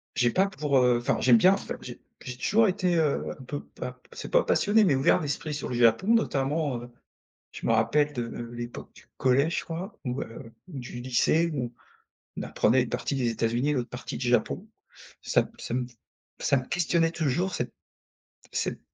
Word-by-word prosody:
J'ai 120 -2 +3
pas 190 +7 +3
pour, 150 -8 0
heu, 125 -1 +4
enfin 120 - 0
j'aime 125 -2 +6
bien 185 +9 +6
enfin 195 - -4
j'ai 120 -1 -9 0.2
j'ai 125 - -6
toujours 215 - +3
été, 185 -2 +1
heu, 155 -3 +1
un - - -10
peu 145 +3 -4
pas 125 - -7
p 125 - -28
c'est - - -8
pas - - +5
passionné 215 +2 +3
mais 165 -9 +4
ouvert 135 - +4
d'esprit 150 +1 -3
sur 150 - -4
le 125 - -3
Japon. 120 - +4
Notamment, 145 - +1
heu, 120 - -10 0.6
je - - -7
me 115 - +3
rappelle 145 +7 +2
de 120 -4 -3 0.3
l'époque 120 0 -7
du - - -18
collège 135 +5 +2
je - - -11
crois 175 +5 -6
ou, 125 0 -2
heu, 115 0 -9 0.2
ou 150 -7 -7
du 120 -1 -7
lycée 130 +7 +2
où 125 -5 -3 0.6
on - - -3
apprenait 125 +3 +2
une 125 - -4
partie 125 +4 -2
des 125 -3 +1
États-Unis, 115 +5 0
l'autre 125 -4 -1
partie - - -6
du - - -2
Japon. - - +1 0.6
Ça - - +3
me - - -10
ça - - -5
me 125 0 -1 0.5
ça 140 - +2
me 130 - -6
questionnait 170 -1 +1
toujours, 170 +3 -1
cette 120 -1 -3 0.8
cette - - -2
135 Hz, 200 wpm, -27 LUFS, 120-165 Hz, 0.8 s, j'aime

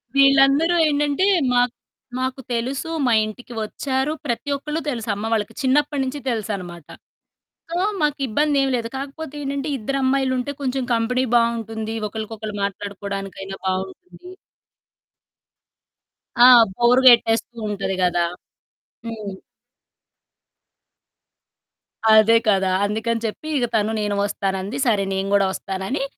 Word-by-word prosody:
వీళ్ళందరూ 275 +4 +5
ఏంటంటే 290 +3 +1 0.3
మాకు 245 0 +2 0.5
మాకు 260 +1 -3
తెలుసు. 260 +7 -2 0.2
మా 240 - +3
ఇంటికి 240 +3 -9
ఒచ్చారు. 265 +5 -2
ప్రతి 245 +2 -3
ఒక్కళ్ళు 300 +3 -4
తెలుసు 235 -4 -4
అమ్మ 220 +3 -4
వాళ్ళకి 210 -2 -1
చిన్నప్పటి 285 +2 +1
నుంచి 265 +2 -4
తెలుసనమాట. 195 -8 -4 0.8
సో, 345 - -1 0.2
మాకు 295 -1 0
ఇబ్బందేమి 275 +2 +1
లేదు. 230 -1 -3
కాకపోతే 280 +2 -7
ఏంటంటే, 280 +2 -3
ఇద్దరు 275 +5 -3
అమ్మాయిలుంటే 260 0 0
కొంచెం 265 0 -1
కంపెనీ 245 +3 +1
బావుంటుంది. 225 -1 0
ఒకళ్ళకొకళ్ళు 215 0 -6
మాట్లాడుకోవడానికైనా 195 -1 -5
బావుంటుంది. 190 - -5 2.1
ఆ! 245 - +10 0.3
బోర్ 240 +3 +4
గెట్టేస్తూ 235 -1 +4
ఉంటది 195 -2 -2
గదా! 175 -1 +2 0.8
హ్మ్. 215 -3 -6 2.8
అదే 220 +1 +6
కదా! 195 -2 +3 0.2
అందుకని 225 +3 -1
చెప్పి 225 +8 -5
ఇగ 245 - +1
తను 215 0 +1
నేను 205 -1 -1
ఒస్తానంది. 195 +3 -3
సరే 205 -4 +2
నేను 190 +1 -2
కూడా 200 -1 +4
ఒస్తానని 195 +10 -3
230 Hz, 110 wpm, -21 LUFS, 205-275 Hz, 2.8 s, ఆ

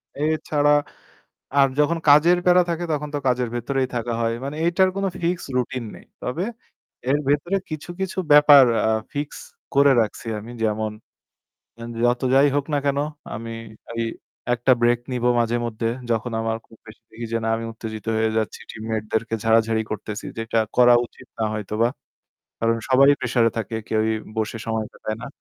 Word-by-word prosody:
এ 140 - -6 0.3
ছাড়া 145 -1 +3 0.9
আর 135 -1 +6
যখন 155 +3 +2
কাজের 165 +5 +6
প্যারা 180 0 +6
থাকে 170 +1 -2
তখন 150 0 -2
তো - - +1
কাজের 125 -1 +1
ভেতরেই 130 +2 -1
থাকা 120 0 -2
হয়। 115 0 +1
মানে 140 +2 -5
এইটার 185 +2 +3
কোন 195 - -1 0.2
fixed 170 -1 -1
routine 125 -1 -2
নেই। - - -16 0.2
তবে 155 +9 -2 0.7
এর 145 - +3
ভেতরে 150 +7 +1
কিছু, 155 +2 -6
কিছু 190 0 -3
ব্যাপার 145 -2 +9 0.3
আ - - +3 0.2
fixed 145 +1 -5 0.3
করে 140 0 +6
রাখছি 110 +2 -3
আমি। 115 +3 -9
যেমন 110 0 0 1.1
যত 120 0 +2
যাই 140 +2 +6
হোক 145 -1 +1
না - - +2
কেন 140 0 +1 0.4
আমি 115 +2 -6 0.4
এই 115 - -1 0.5
একটা 120 +2 +3
break 120 0 +3
নিব 125 -1 -2 0.2
মাঝেমধ্যে। 115 -1 -1 0.2
যখন 115 +1 -1
আমার 115 0 -1
খুব 115 - -18
বেশি 110 - -14
দেখি 115 +1 -7
যে 115 - +1
না 115 - 0
আমি 115 - -5
উত্তেজিত 110 -1 -7
হয়ে 110 0 +2
যাচ্ছি, 110 - -3
team 110 - -9
mate-দেরকে 110 +1 -2
ঝাড়াঝাড়ি 115 0 +3
করতেছি, 105 0 -5
যেটা 115 0 -1 0.2
করা 125 -1 +7
উচিত - - -18
না 110 - 0
হয়তোবা। 110 +2 0 0.7
কারণ 115 0 +2
সবাই 135 +1 +6
pressure-এ 115 -3 +2
থাকে, 110 0 -3
কেউই 110 0 +1 0.3
বসে 110 +1 -1
সময় 110 -1 -1
কাটায় 110 0 -5
না। - - -6
120 Hz, 170 wpm, -23 LUFS, 110-145 Hz, 1.1 s, ব্যাপার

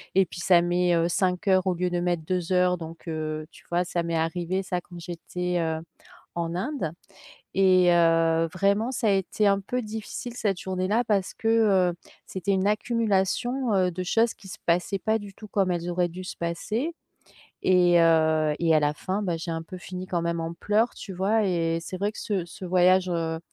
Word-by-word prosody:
et 195 -1 +5
puis 175 - -10
ça 175 0 +5
met, 175 0 +1
heu, 165 0 +2
5 180 +1 0
heures 190 0 +3
au 185 - +3
lieu 180 +1 -1
de 175 0 -1
mettre 175 -2 -1
2 180 +1 -1
heures 180 0 +3
donc, 165 +1 -10
heu, 155 -1 -3
tu - - -18
vois? 175 +1 +1
Ça 175 -1 -2
m'est 170 0 -2
arrivé 175 +3 -1
ça, 180 -1 -2
quand 175 0 -12
j'étais, 180 +1 -4
heu, 160 -1 -1 0.6
en 170 0 -2
Inde, 240 - -2 0.6
et 185 -2 +5
heu, 165 -1 +3
vraiment 200 +5 +1
ça 245 -3 -1
a - - +4
été 195 +2 0
un 200 0 +3
peu 250 +6 -3
difficile 220 +3 -6
cette 200 -6 -1
journée-là 190 +5 0
parce 200 -4 0
que, 225 - -4 0.4
heu, - - -7 0.3
c'était 190 +1 -3
une 190 0 +1
accumulation, 230 +3 0
heu, 185 -1 +2
de 185 +2 -5
choses 225 +5 +2
qui 195 - -15
se - - -8
passaient 175 +3 +1
pas 220 +2 +1
du 200 -1 -10
tout 215 - -11
comme 195 -2 +1
elles 175 0 -2
auraient 175 0 +1
dû 185 +2 -8
se - - -7
passer. 215 - -2 0.7
Et 175 -2 +5
heu, 160 -2 +3
et 165 -2 +3
à 155 - +4
la 145 0 +2
fin, 190 +7 -3
bah, 175 -4 -1
j'ai 165 +1 -5
un 165 0 -3
peu 185 +3 -9
fini 185 +1 -7
quand 175 -2 -1
même 170 0 -1
en 165 +1 -3
pleurs, 215 +6 +1
tu 195 - -8
vois? 205 +4 +1
Et 165 -2 0
c'est 185 - -6
vrai 205 +3 -1
que - - -12
ce 195 -5 -2
ce 175 +2 -10
voyage, 185 +1 +4
heu 165 -2 -1
180 Hz, 210 wpm, -26 LUFS, 170-195 Hz, 0.7 s, et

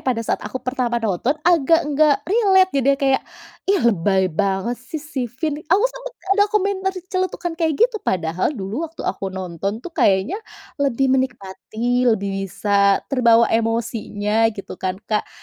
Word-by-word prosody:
pada 245 -3 -1
saat - - -1
aku 210 +5 -5
pertama 250 -2 -1
nonton, 230 - 0
agak 330 -1 +4
nggak 295 0 +3
relate 385 -2 +4
jadinya 275 0 +2
kayak, 270 -2 +1 0.5
"Ih 400 - +4
lebay 190 -3 +2
banget 200 +7 -1
sih 255 +5 -7
si 300 -3 -4
Finn," 295 +5 -3
aku 390 +6 +4
sempet - - -3 0.2
ada 410 +1 +4
komentar 395 -2 0 0.2
celetukan 370 -2 -2
kayak 320 -3 +1
gitu, 465 -1 +2
padahal 170 -1 -1
dulu 220 +12 -4
waktu 325 - -10
aku 195 0 -2
nonton 190 +3 -5
tuh 355 - -7
kayaknya 205 - +1 0.4
lebih 270 -1 +2
menikmati, 245 0 -1
lebih 195 -3 -1
bisa 200 +1 +2
terbawa 235 -3 +5
emosinya 225 -1 0
gitu 195 - -9
kan 185 0 -2
Kak, 215 -1 -1
245 Hz, 150 wpm, -21 LUFS, 200-320 Hz, 0.5 s, terbawa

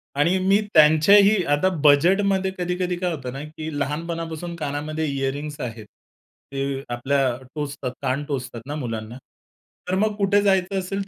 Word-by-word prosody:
आणि 170 +6 +2
मी 195 +2 +3
त्यांच्याही 180 +6 +6
आता 145 +6 +3
बजेटमध्ये 190 +6 +4
कधी-कधी 180 0 -1
काय 180 0 -1
होतं 130 -4 -6
ना, 140 +2 -6
की 155 +1 -7
लहानपणापासून 165 +3 -4
कानामध्ये 155 +1 -3
इयरिंग्स 140 +2 -3
आहेत. 115 -3 -6 0.7
ते 135 0 -2
आपल्या 130 0 +1 0.2
टोचतात 140 -3 -4
कान 135 +2 -1
टोचतात 125 -5 -5
ना, 145 - -4
मुलांना. 115 -4 -5 0.7
तर 185 - +1
मग 215 0 +1
कुठे 200 0 +3
जायचं 190 -1 +1
असेल, 195 +1 -4
155 Hz, 140 wpm, -23 LUFS, 140-185 Hz, 0.7 s, त्यांच्याही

